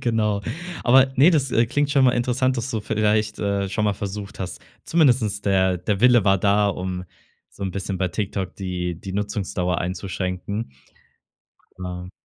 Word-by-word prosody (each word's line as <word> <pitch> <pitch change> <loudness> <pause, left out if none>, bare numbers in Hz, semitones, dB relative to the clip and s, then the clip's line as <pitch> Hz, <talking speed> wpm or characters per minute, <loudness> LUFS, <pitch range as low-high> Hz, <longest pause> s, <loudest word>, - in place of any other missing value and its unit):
Genau. 105 -3 0 0.4
Aber 130 +2 +5
ne, 145 +7 +7
das, 140 -6 +1
äh, 115 0 +3
klingt 145 +4 0
schon 140 -2 +4
mal 125 - +5
interessant, 125 +2 +1
dass 120 +2 -3
du 110 - -2
vielleicht, 105 0 0
äh, 100 -1 -1
schon 105 +3 -1
mal 105 - +2
versucht 100 0 -6
hast, 95 - -5 0.2
zumindest 120 -10 +2
der 95 -2 +2
der 100 +2 -2
Wille 120 -3 +5
war 95 -1 +4
da, 100 +1 +3
um 90 -1 -3 0.5
so 100 - -11
'n 95 - -1
bisschen 95 0 -4
bei 95 -1 0
TikTok 95 0 -3
die 90 -3 -3
die 95 -1 -7
Nutzungsdauer 95 -3 -2
einzuschränken. 95 +3 -3 1.1
Klar. 90 0 -6
100 Hz, 165 wpm, -23 LUFS, 95-115 Hz, 1.1 s, ne